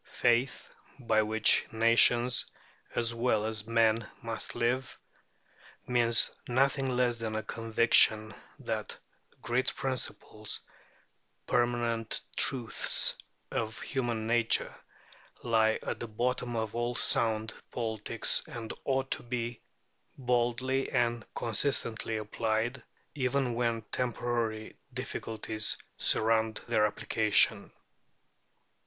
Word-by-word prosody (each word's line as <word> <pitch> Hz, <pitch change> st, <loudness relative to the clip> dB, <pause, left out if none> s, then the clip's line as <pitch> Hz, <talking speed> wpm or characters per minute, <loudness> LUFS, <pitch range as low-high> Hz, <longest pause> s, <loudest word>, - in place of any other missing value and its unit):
Faith, 125 Hz, +2 st, 0 dB, 0.2 s
by 115 Hz, -4 st, +1 dB
which 110 Hz, 0 st, +4 dB
nations 115 Hz, +2 st, +4 dB, 0.5 s
as 115 Hz, 0 st, 0 dB
well 115 Hz, -2 st, 0 dB
as 110 Hz, -1 st, -2 dB
men 115 Hz, -1 st, +2 dB, 0.2 s
must 115 Hz, -1 st, -3 dB
live, 125 Hz, +2 st, -1 dB, 0.9 s
means 120 Hz, -2 st, +4 dB, 0.2 s
nothing 135 Hz, +2 st, +1 dB
less 125 Hz, -1 st, +1 dB
than 110 Hz, -1 st, -4 dB
a 110 Hz, -, -2 dB
conviction 110 Hz, -1 st, +3 dB, 0.2 s
that -, -, -4 dB, 0.5 s
great 125 Hz, +2 st, 0 dB
principles, 125 Hz, -4 st, -3 dB, 0.9 s
permanent 120 Hz, -2 st, 0 dB, 0.2 s
truths 120 Hz, -5 st, +3 dB, 0.4 s
of 110 Hz, 0 st, -3 dB
human 120 Hz, -5 st, -2 dB
nature, 115 Hz, 0 st, +2 dB, 0.7 s
lie 110 Hz, -2 st, +2 dB
at -, -, -4 dB
the 120 Hz, -, -5 dB
bottom 120 Hz, +2 st, -2 dB
of 110 Hz, -2 st, -3 dB
all 120 Hz, +1 st, -2 dB
sound 110 Hz, -1 st, +1 dB, 0.2 s
politics, 110 Hz, -1 st, +1 dB
and 120 Hz, -7 st, -7 dB
ought 135 Hz, -1 st, -1 dB
to -, -, -2 dB
be 120 Hz, -1 st, -4 dB, 0.6 s
boldly 125 Hz, +1 st, 0 dB
and 120 Hz, -3 st, 0 dB
consistently 115 Hz, -1 st, 0 dB
applied, 110 Hz, +3 st, -2 dB, 0.3 s
even 130 Hz, -2 st, -1 dB
when 115 Hz, -1 st, -1 dB
temporary 120 Hz, -3 st, -2 dB, 0.2 s
difficulties 110 Hz, -4 st, -3 dB, 0.2 s
surround 110 Hz, 0 st, +2 dB
their 105 Hz, 0 st, +3 dB
application. 105 Hz, 0 st, +2 dB
115 Hz, 100 wpm, -30 LUFS, 110-125 Hz, 0.9 s, which